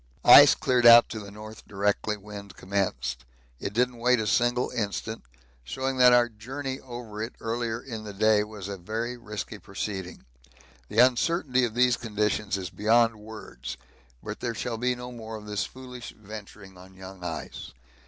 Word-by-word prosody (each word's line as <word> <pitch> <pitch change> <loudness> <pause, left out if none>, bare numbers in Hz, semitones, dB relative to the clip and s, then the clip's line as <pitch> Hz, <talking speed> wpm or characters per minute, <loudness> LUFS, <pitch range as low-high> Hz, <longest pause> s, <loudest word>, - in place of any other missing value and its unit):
Ice - - +10
cleared 125 -2 +3
out 120 0 +9
to 110 - -5
the 100 -1 -9
north 110 +2 -11
directly 105 +1 -1
wind 100 -1 -10
commenced 80 -11 -2 0.4
it 100 - -4
didn't 120 +2 0
wait 125 +1 +3
a 110 - -1
single 120 +3 +1
instant, 110 -1 -3 0.4
showing 130 - -3
that 125 -1 +7
our 120 -1 +5
journey 130 +5 -6
over 120 -4 -8
it 110 +3 -5
earlier 115 0 -2
in 115 -4 -7
the 105 - -7
day 105 +1 +3
was 105 -2 -8
a 100 -1 -5
very 110 +6 -4
risky 105 -2 -7
proceeding 100 -2 -6 0.6
the 105 - -7
uncertainty 130 +1 +3
of 115 -1 -5
these 125 -1 +3
conditions 105 -2 -1
is 90 -2 -6
beyond 115 +1 +3
words, 105 - -9 0.5
but - - -6
there 120 -2 -3
shall 115 0 -3
be 125 +1 +1
no 125 0 -8
more 115 -2 -8
of 105 -1 -9
this 105 -1 -2
foolish 125 -2 -10
venturing 100 -3 -11
on 95 +1 -15
young 95 -1 -11
ice. 80 -3 -6
110 Hz, 170 wpm, -27 LUFS, 100-120 Hz, 0.6 s, Ice